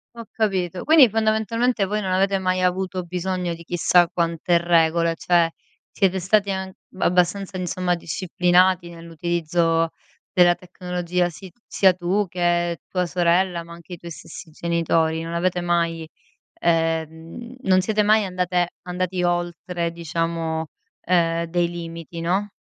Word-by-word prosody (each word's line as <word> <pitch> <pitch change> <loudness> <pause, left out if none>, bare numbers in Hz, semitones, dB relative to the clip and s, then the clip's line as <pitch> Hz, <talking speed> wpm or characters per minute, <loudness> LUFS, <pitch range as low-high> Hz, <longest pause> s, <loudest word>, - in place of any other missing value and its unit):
Ho 230 -1 -8
capito. 185 -5 -1
Quindi, 310 -4 +7
fondamentalmente 220 +1 +1
voi 210 +2 -2
non 190 -2 -2
avete 195 +1 +2
mai 185 -1 0
avuto 185 0 -1
bisogno 180 0 -3
di 170 0 -10
chissà 175 +1 +3
quante 170 0 0
regole. 170 -1 +2
Cioè, 170 0 +2 0.4
siete 190 -2 +1
stati 200 +2 +2
an 190 0 -3 0.3
abbastanza, 185 +2 +1
insomma, 180 0 -1
disciplinati 180 +1 +1
nell'utilizzo 165 0 -1 0.4
della 175 -2 +5
tecnologia, 180 -1 -2
si 185 +2 -11 0.2
sia 190 -2 +4
tu 185 +4 0
che 175 -1 0
tua 180 -1 -1
sorella, 175 0 +1
ma 170 0 -12
anche 170 +1 -12
i - - -7
tuoi 170 +1 -10
stessi 160 +1 -10
genitori. 165 0 0
Non 165 +1 -5
avete 180 +1 0
mai, 170 -2 -1 0.5
ehm, 165 +7 -2
non 185 -5 +3
siete 215 +2 +1
mai 215 0 +4
andate 180 -1 0 0.2
andati 180 0 -2
oltre 175 0 -2
diciamo, 165 -1 -3 0.3
ehm, 170 -1 +1
dei 170 +1 0
limiti 170 -1 -7
no? 190 +5 0
175 Hz, 135 wpm, -22 LUFS, 170-185 Hz, 0.5 s, Quindi